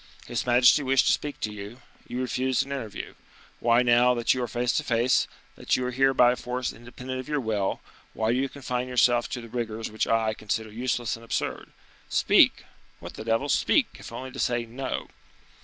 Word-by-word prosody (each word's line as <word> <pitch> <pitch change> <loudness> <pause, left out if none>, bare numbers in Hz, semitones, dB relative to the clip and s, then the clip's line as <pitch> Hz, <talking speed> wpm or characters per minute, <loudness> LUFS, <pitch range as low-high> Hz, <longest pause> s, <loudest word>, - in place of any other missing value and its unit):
His 120 +1 -3
majesty 125 +4 +6
wished 135 -1 +3
to - - +4
speak 145 -1 -3
to 105 - -2
you, 105 +4 -9 0.3
you 125 - -3
refused 130 +1 0
an 140 - -10
interview; 125 -7 -5 0.5
why, 120 +1 +4
now 120 +1 +4
that 120 -1 +2
you 130 - -3
are 120 - -1
face 120 +2 0
to - - 0
face, 120 +1 +2 0.3
that - - 0
you 130 - -2
are 125 - -2
here 135 +2 +3
by 125 -2 +5
a - - 0
force 125 0 -3
independent 125 +2 -7
of 130 - -7
your 150 -1 0
will, 105 -5 -1 0.3
why 110 0 +1
do 120 - +1
you 135 0 0
confine 125 -3 -3
yourself 120 -2 +3
to 125 - -4
the 115 - -10
rigors 115 -2 -4
which 110 - -1
I 110 -1 +2
consider 110 +1 -3
useless 120 +1 -1
and 115 - -13
absurd? 115 - -3 0.4
Speak! - - +4 0.3
what - - -9
the - - -7
devil! 115 +5 0
speak, - - +3
if - - -10
only 130 0 -7
to 135 - -9
say 120 -2 0
'No. 130 +3 -4
120 Hz, 205 wpm, -26 LUFS, 115-130 Hz, 0.5 s, majesty